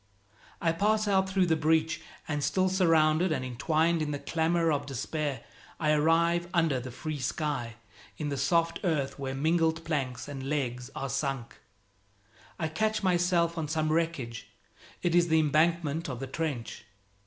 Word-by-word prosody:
I 165 - +2
pass 210 +5 +1
out 190 -1 +2
through 190 -1 +2
the 165 -2 +2
breach; 160 +1 +1 0.3
and 145 -2 -2
still 185 +4 +2
surrounded 165 -2 +3
and 130 -5 -1
entwined 160 +7 +1
in 150 - -1
the 145 - -2
clamor 165 +2 +1
of 145 -1 -1
despair, 140 +2 -3 0.4
I 150 -2 +2
arrive 165 +3 +3
under 165 -6 +2
the 125 +1 -7
free 155 +4 -5
sky, 125 -3 -2 0.4
in 150 - -3
the 140 - -2
soft 165 +5 +1
earth 150 -7 -1
where 135 -1 -3
mingled 160 +2 +1
planks 135 -6 -2
and 135 -2 -6
legs 125 -4 -2
are 135 - -3
sunk. 135 -2 -3 1.0
I 160 - -1
catch 215 +7 -1
myself 175 -2 +2
on 155 - -2
some 155 0 0
wreckage; 155 -9 -2 0.6
it 175 - +1
is 175 0 +4
the 160 -1 +4
embankment 155 +1 +1
of 125 -3 -5
the 135 - -4
trench. 135 -4 -4
155 Hz, 160 wpm, -29 LUFS, 140-170 Hz, 1.0 s, is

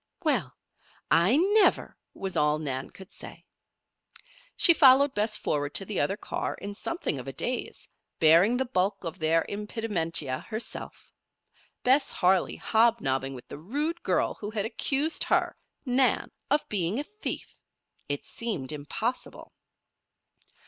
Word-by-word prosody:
"Well! 215 - 0 0.6
I 185 +11 +4
never!" 400 +5 +3 0.2
was 190 -1 -4
all 150 0 +2
Nan 135 -4 -4
could 190 0 -14
say. - - -10 1.1
She 340 - +8
followed 275 -2 +6
Bess 210 +1 0
forward 145 -5 -2
to 195 - +5
the 210 - -2
other 195 - 0
car - - -4
in 205 0 -7
something 335 - -3
of - - -9
a - - -3
daze, - - -4 0.3
bearing 170 +9 +5
the 265 - 0
bulk 195 -4 -1
of 170 +1 -6
their 160 +1 +2
impedimenta 200 - -2
herself. 220 +1 -7 0.7
Bess 265 +2 +3
Harley 185 0 +2
hobnobbing 140 - +1
with 125 - -12
the - - -9
rude 295 - -3
girl - - 0
who 205 - -7
had 215 -2 -2
accused 275 +7 +1
her, - - +1 0.3
Nan, 255 0 +2 0.2
of 295 - +1
being 195 0 0
a 285 - -1
thief! 425 +7 -5 0.5
It 145 0 -3
seemed 205 - -3
impossible. 185 - -5
205 Hz, 135 wpm, -27 LUFS, 160-255 Hz, 1.1 s, She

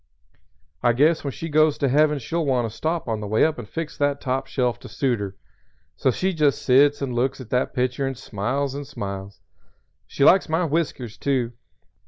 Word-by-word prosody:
I 120 -1 +3
guess 155 +6 +3
when 140 - -2
she 165 - -6
goes 155 -1 +3
to 140 - +1
Heaven 150 +3 +3
she'll 165 +6 -2
want 130 -5 +1
to 110 - -10
stop 160 -1 -2
on 110 -2 -1
the 105 - -5
way 110 +2 +3
up 160 -4 -1
and 110 - -8
fix 165 -1 -5
that 145 -1 +1
top 135 +1 -2
shelf 125 -3 -1
to - - -11
suit 125 -5 0
her. 100 -2 -5 0.6
So - - +1
she 185 +9 0
just 150 -4 +1
sits 140 +2 +4
and 130 -3 -2
looks 130 +3 0
at 125 -3 -10
that 125 +2 0
picture 130 +1 0
and 135 -2 -4
smiles 130 +5 -2
and 140 0 -6
smiles. 100 -2 -6 0.7
She 140 - -1
likes 185 +3 +5
my 165 +3 +1
whiskers, 140 -7 -2
too. 125 -4 0
135 Hz, 205 wpm, -23 LUFS, 120-150 Hz, 0.7 s, likes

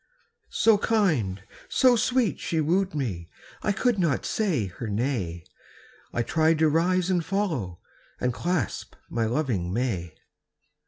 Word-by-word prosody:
So 220 -2 +4
kind, 150 - +1 0.3
so 255 -2 +5
sweet 240 -1 +1
she 165 - -1
wooed 180 +3 +1
me, 95 - -3 0.3
I 210 - +1
could 235 +1 +1
not 165 -8 +1
say 180 - 0
her 95 +5 -7
nay; 100 -7 -2 0.7
I 120 - 0
tried 160 +4 +2
to 160 0 +4
rise 180 +4 +2
and 175 -2 +1
follow, 160 - -2 0.4
And 125 0 0
clasp 170 - -2 0.2
my 115 -1 0
loving 115 - -1
may. 95 -8 -2
155 Hz, 130 wpm, -26 LUFS, -, 0.7 s, so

